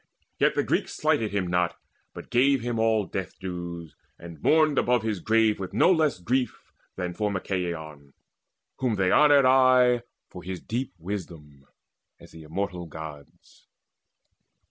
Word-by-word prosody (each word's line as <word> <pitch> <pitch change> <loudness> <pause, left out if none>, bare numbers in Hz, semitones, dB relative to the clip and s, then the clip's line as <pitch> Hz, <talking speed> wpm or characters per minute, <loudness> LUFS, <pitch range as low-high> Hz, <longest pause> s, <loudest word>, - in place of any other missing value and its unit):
Yet - - +3
the - - +1
Greeks - - -1
Slighted 110 -2 +1
him 100 -2 -1
not, 90 0 0 0.4
but - - -10
gave 130 +2 +3
him 120 -1 -2
all 110 -2 +2
death 95 -1 -6
dues, 85 -3 -7 0.2
And 85 -3 -11
mourned 155 -2 +3
above 125 -2 +1
his 110 -4 -2
grave 110 +2 +2
with 95 -2 -6
no - - +5
less 155 - +2
grief 125 +7 -2 0.2
Than 90 -1 -4
for 105 +3 -1
Machaon, 85 -7 -4 0.6
whom 125 -4 0
they 95 -2 +1
honoured 145 -2 +6
aye, 130 -2 +5 0.3
For 90 - -11
his 90 +1 -6
deep 120 -2 -4
wisdom, 80 -6 -8 0.5
as - - -16
the 80 - -12
immortal 85 +2 -4
Gods. 75 -2 -12
95 Hz, 145 wpm, -26 LUFS, 85-120 Hz, 0.6 s, honoured